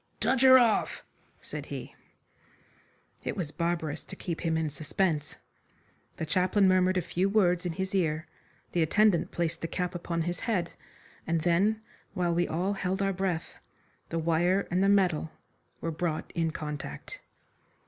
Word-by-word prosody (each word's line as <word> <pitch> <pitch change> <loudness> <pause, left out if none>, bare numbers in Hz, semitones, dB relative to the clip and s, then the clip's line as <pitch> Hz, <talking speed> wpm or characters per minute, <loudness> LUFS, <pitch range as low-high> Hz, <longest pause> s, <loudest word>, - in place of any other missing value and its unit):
"Touch 260 -1 +2
her 260 -1 +9
off!" 235 -4 +2 0.4
said - - -6
he. - - -7 1.3
It - - -3
was 165 -6 -3
barbarous 165 -3 -2
to - - -9
keep 170 -3 -4
him 165 -1 +1
in 160 -2 -1
suspense. 155 +1 -1 0.8
The - - -2
chaplain 185 +4 +3
murmured 185 0 +3
a 180 - +1
few 185 +4 0
words 180 -3 +2
in 170 - -3
his 190 +2 -3
ear, 160 -4 +1 0.5
the 175 - +1
attendant 200 +3 +3
placed 170 -1 -2
the 165 - -2
cap 180 +2 -2
upon 170 -1 -2
his 175 0 -3
head, 180 -7 -1 0.6
and 165 0 +1
then, 200 +6 +2 0.3
while 175 -2 +1
we 175 +1 +1
all 180 +5 0
held 190 0 -1
our 195 0 +1
breath, 180 -3 -2 0.6
the 165 - -2
wire 170 +4 +2
and 180 +2 +2
the 195 - +4
metal 185 -6 +3 0.5
were 165 - -2
brought 160 0 -3
in 165 -1 0
contact. 150 - -6
175 Hz, 160 wpm, -29 LUFS, 165-190 Hz, 1.3 s, her